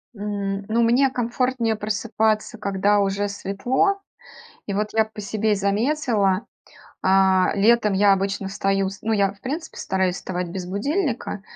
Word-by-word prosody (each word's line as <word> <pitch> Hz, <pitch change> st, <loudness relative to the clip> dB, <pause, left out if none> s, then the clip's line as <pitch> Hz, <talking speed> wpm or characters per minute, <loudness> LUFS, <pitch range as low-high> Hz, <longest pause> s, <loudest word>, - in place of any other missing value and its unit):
М, 200 Hz, -1 st, -3 dB
ну, 230 Hz, +2 st, +2 dB
мне 250 Hz, +4 st, +4 dB
комфортнее 245 Hz, -1 st, -1 dB
просыпаться, 215 Hz, 0 st, -1 dB
когда 200 Hz, +1 st, +1 dB
уже 200 Hz, +1 st, 0 dB
светло. 225 Hz, -, 0 dB, 0.7 s
И 200 Hz, -, -3 dB
вот 210 Hz, +1 st, -1 dB
я 220 Hz, -1 st, +3 dB
по 215 Hz, -1 st, -10 dB
себе 215 Hz, +1 st, 0 dB
заметила, 210 Hz, -1 st, +1 dB, 0.6 s
а, 190 Hz, -1 st, +4 dB
летом 215 Hz, +1 st, +3 dB
я 200 Hz, +1 st, +4 dB
обычно 195 Hz, 0 st, -1 dB
встаю 195 Hz, -1 st, 0 dB
с 195 Hz, +1 st, -10 dB
ну, 225 Hz, -, -1 dB
я, 200 Hz, -2 st, +2 dB
в 200 Hz, -, -23 dB
принципе, 315 Hz, +5 st, -5 dB
стараюсь 190 Hz, -1 st, -1 dB
вставать 180 Hz, -2 st, -4 dB
без 180 Hz, +1 st, -5 dB
будильника, 240 Hz, -, -2 dB
205 Hz, 145 wpm, -23 LUFS, 195-230 Hz, 0.7 s, мне